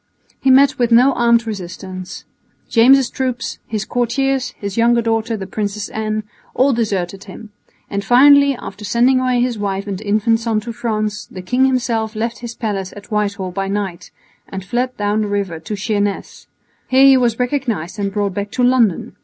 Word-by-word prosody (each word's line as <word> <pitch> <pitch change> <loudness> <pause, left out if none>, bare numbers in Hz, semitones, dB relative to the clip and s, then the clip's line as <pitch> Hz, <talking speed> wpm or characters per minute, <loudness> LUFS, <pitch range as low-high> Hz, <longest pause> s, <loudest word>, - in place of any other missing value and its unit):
He 270 - +1
met 270 +1 +5
with 240 -1 +1
no 250 +4 +5
armed 235 -1 +3
resistance. 185 -2 -7 0.4
James' 260 +3 +5
troops, 255 -1 -3
his 215 -2 -3
courtiers, 255 +1 -1
his 200 -1 -5
younger 235 0 +3
daughter 225 0 -1
the 195 - -6
Princess 205 +1 -4
Anne, 215 0 -3 0.3
all 270 +1 +3
deserted 195 -4 -2
him; 210 +2 -11 0.4
and 200 0 -3
finally, 280 +4 +6
after 205 -3 -9
sending 240 +6 +3
away 255 -1 +1
his 245 -3 -1
wife 200 -1 -2
and 200 -1 -5
infant 215 +2 +1
son 225 -2 0
to 235 +2 -6
France, 215 -3 -3
the 185 - -9
king 250 +8 +2
himself 235 -4 -1
left 230 +2 -3
his 235 -1 -7
palace 195 -4 -3
at 205 - -13
Whitehall 200 -3 -1
by 195 +2 -3
night 195 -3 -4 0.4
and 190 -1 -6
fled 250 +4 -2
down 210 +1 0
the 210 - -1
river 200 -5 -2
to 185 +6 -5
Sheerness. 205 -1 -3 0.4
Here 265 +1 +5
he 270 -1 +8
was 240 -3 +1
recognised 245 - -2
and 200 -1 -1
brought 200 -1 -1
back 200 +2 -4
to 255 - 0
London. 245 -7 +2
220 Hz, 180 wpm, -18 LUFS, 200-245 Hz, 0.4 s, he